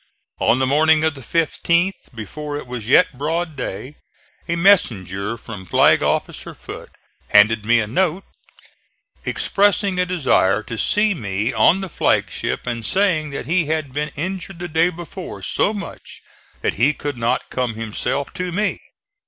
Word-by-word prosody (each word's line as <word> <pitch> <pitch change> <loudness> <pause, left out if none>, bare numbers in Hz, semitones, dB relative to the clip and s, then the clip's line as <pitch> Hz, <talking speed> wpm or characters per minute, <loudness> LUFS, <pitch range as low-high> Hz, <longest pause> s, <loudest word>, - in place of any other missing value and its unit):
On 120 - +3
the 130 - +1
morning 155 +3 +4
of 160 -1 +2
the 135 - -11
15th, 170 +3 0
before 145 +7 -6
it - - -7
was 120 -3 -6
yet 130 - +4
broad 160 +2 -2
day, 130 +3 -6 0.5
a 170 - 0
messenger 110 - +2
from 105 -5 -9
Flag - - +4
officer - - -2
Foote - - -10 0.4
handed 105 +1 +5
me 120 +1 +4
a 110 - 0
note, 180 - 0 1.0
expressing 200 -1 +2
a 180 - +3
desire 130 - +2
to 115 - -6
see 210 - +2
me 105 - -2
on 140 - +4
the 190 - -4
flag 170 - +1
ship - - -3
and 120 -2 -3
saying 170 - +1
that 140 - -5
he 170 +3 +1
had 155 -3 -2
been 150 +2 -2
injured 185 +3 -5
the 175 +1 -5
day 165 +2 +2
before 175 +1 -8
so - - +1
much 205 -2 -8 0.4
that - - 0
he 140 +5 +4
could 145 -1 -4
not 115 0 -1
come 125 -3 -2
himself 115 +5 -3
to 180 -1 -3
me. 205 +4 -1
150 Hz, 160 wpm, -20 LUFS, 115-175 Hz, 1.0 s, handed